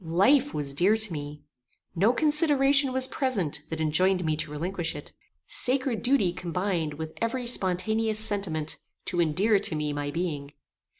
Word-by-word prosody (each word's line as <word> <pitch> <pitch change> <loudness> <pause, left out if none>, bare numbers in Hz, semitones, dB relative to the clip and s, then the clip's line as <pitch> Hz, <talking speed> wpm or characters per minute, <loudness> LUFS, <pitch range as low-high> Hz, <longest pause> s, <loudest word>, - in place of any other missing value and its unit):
Life 250 - +2
was 140 -2 -2
dear 190 +9 +3
to 215 -5 +4
me. 145 -1 -7 0.5
No 200 +7 +3
consideration 285 -1 +3
was 260 0 +3
present 200 - -2
that 160 - -5
enjoined 180 +4 +2
me 155 -1 0
to 155 - -4
relinquish 170 +3 -4
it. - - -10 0.3
Sacred 255 -2 +1
duty 245 -9 +1
combined 175 -3 -3
with 160 +1 -7
every 240 +2 -2
spontaneous 220 +1 0
sentiment 195 -8 -1 0.3
to 175 -1 -1
endear 195 +7 +2
to 160 - +1
me 150 -1 -2
my 145 0 -4
being. 145 -3 -4
185 Hz, 155 wpm, -26 LUFS, 155-230 Hz, 0.5 s, to